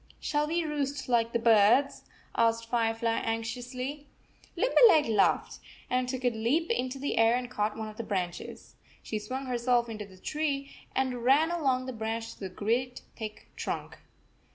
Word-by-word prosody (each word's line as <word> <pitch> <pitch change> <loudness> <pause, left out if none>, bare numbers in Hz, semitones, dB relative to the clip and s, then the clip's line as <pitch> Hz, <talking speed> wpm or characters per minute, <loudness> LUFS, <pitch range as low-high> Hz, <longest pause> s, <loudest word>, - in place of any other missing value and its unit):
"Shall 295 0 0
we 335 +2 0
roost 285 -3 -2
like 230 -1 +2
the 235 - +1
birds?" 230 +4 +4 0.3
asked 230 0 +2
Firefly 230 -1 +1
anxiously. 250 +5 -4 0.5
Limberleg 440 -10 +6
laughed, 195 - +2 0.3
and 250 0 +1
took 260 0 -4
a 245 - +4
leap 245 - 0
into 255 - -1
the 275 -3 -1
air, 225 +1 +5
and 250 0 -3
caught 210 -2 -1
one 220 -1 -4
of 215 0 -10
the 230 - -3
branches. 180 -5 -4 0.3
She 215 - -3
swung 255 +6 -5
herself 240 -1 +1
into 215 -2 -6
the 190 -1 -16
tree 280 +4 -2 0.2
and 255 -2 -1
ran 290 +6 +4
along 265 -7 +1
the 260 - -5
branch 225 0 -4
to - - -21
the 190 - -5
great 235 +7 -1
thick 215 -2 -8
trunk. - - -5
245 Hz, 165 wpm, -29 LUFS, 225-275 Hz, 0.5 s, Limberleg